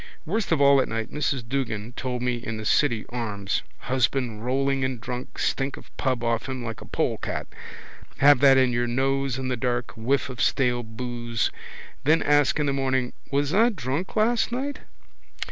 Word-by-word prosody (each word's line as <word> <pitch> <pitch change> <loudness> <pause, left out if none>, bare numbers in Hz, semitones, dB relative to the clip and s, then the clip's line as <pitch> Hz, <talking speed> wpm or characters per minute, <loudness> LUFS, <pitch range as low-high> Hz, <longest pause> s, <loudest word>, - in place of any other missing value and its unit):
Worst 200 +4 -1
of 160 - +3
all 140 -1 +6
at - - -1
night 115 -1 -3
Mrs 140 -5 -1
Duggan 120 -4 -2
told 125 -1 -3
me 125 -1 0
in 115 -2 -5
the 110 - -6
City 120 -2 +2
Arms. 105 -5 -2 0.2
Husband 125 -3 0
rolling 135 +2 +1
in 130 -1 -1
drunk, 125 +2 -6
stink 135 0 -1
of - - -15
pub 130 -3 -1
off 115 +2 0
him 130 -2 -4
like 115 -1 -5
a - - -10
polecat. - - -2 0.7
Have 145 -1 +6
that 135 -1 +7
in 130 -2 +4
your 120 0 +1
nose 135 +1 0
in 130 -1 -3
the 125 - 0
dark, 120 0 -1
whiff 125 +5 0
of 130 -2 -6
stale 125 -3 +2
boose. 120 -1 -3 0.5
Then 155 +3 +4
ask 145 0 +3
in 150 - +2
the 140 - +1
morning: 130 -2 0 0.2
was 145 +1 +1
I 225 +4 +5
drunk 155 - -3
last 230 +2 +2
night? 275 +4 -3
130 Hz, 180 wpm, -25 LUFS, 120-140 Hz, 0.7 s, that